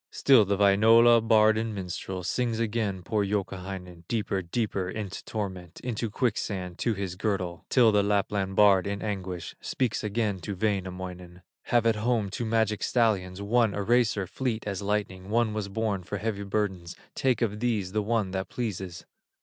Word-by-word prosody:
Still 130 -6 +5
the 100 0 0
minstrel 110 +4 +6
of 120 -1 +6
Wainola 110 -5 +1
Sings 120 +1 -1
again 105 -5 -1
poor 105 +2 0
Youkahainen 95 -3 -4
Deeper, 105 -4 -1
deeper 95 0 -2
into 100 -1 -5
torment, 95 -5 -5
Into 115 -2 -3
quicksand 100 -6 -2
to 115 -3 0
his 95 -2 -4
girdle, 90 -4 -2
Till 120 -4 +5
the 105 -1 +4
Lapland 100 -1 0
bard 100 -2 +5
in 100 0 -3
anguish 95 -5 -4
Speaks 125 -5 -1
again 105 -2 -1
to 100 +4 -5
Wainamoinen: 90 -3 -4 0.2
"Have 120 -1 +2
at 115 -2 +3
home 110 -3 0
two 115 - -3
magic 110 -1 +1
stallions, 100 -5 +1
One 115 0 +2
a 100 - -2
racer, 115 -3 +2
fleet 115 +3 -3
as 100 -2 -3
lightning, 100 -2 -2
One 115 0 +2
was 105 -2 -3
born 105 -2 -1
for 100 +3 -5
heavy 100 0 -3
burdens; 95 -4 -2 0.2
Take 130 -2 +1
of 105 -2 -1
these 110 -6 -1
the 105 +1 0
one 105 -2 0
that 95 0 -3
pleases." 95 -7 -5
105 Hz, 165 wpm, -27 LUFS, 95-110 Hz, 0.2 s, minstrel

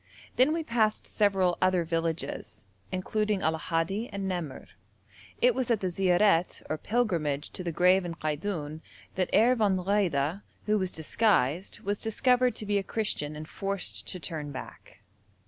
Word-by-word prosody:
Then 260 +4 +4
we 325 +1 -1
passed 220 -6 +1
several 190 -4 +2
other 185 -2 +3
villages, 165 - -3 0.3
including 210 +2 0
Allahaddi 165 +7 -1
and 200 -1 -3
Namerr. 175 -7 -4 0.8
It - - +6
was 255 - -2
at 230 -3 +3
the 185 -2 -2
ziaret 180 0 +2
or 155 - -2
pilgrimage 170 -12 0
to 185 - -6
the 170 - -2
grave 180 +3 +4
in 170 -1 -5
Kaidoun 155 0 -3 0.3
that 185 -1 -1
Herr 240 +4 +5
von 205 -5 +2
Wrede, 180 -3 +1 0.2
who 215 0 +2
was 185 -1 -1
disguised, 170 - +1
was 200 +1 -2
discovered 250 +3 +2
to 215 - -5
be 205 0 +1
a - - -3
Christian 190 -9 -2
and 155 +1 -7
forced 195 +2 -3
to 185 - -2
turn 150 -1 -5
back. 130 - -10
185 Hz, 155 wpm, -28 LUFS, 165-210 Hz, 0.8 s, It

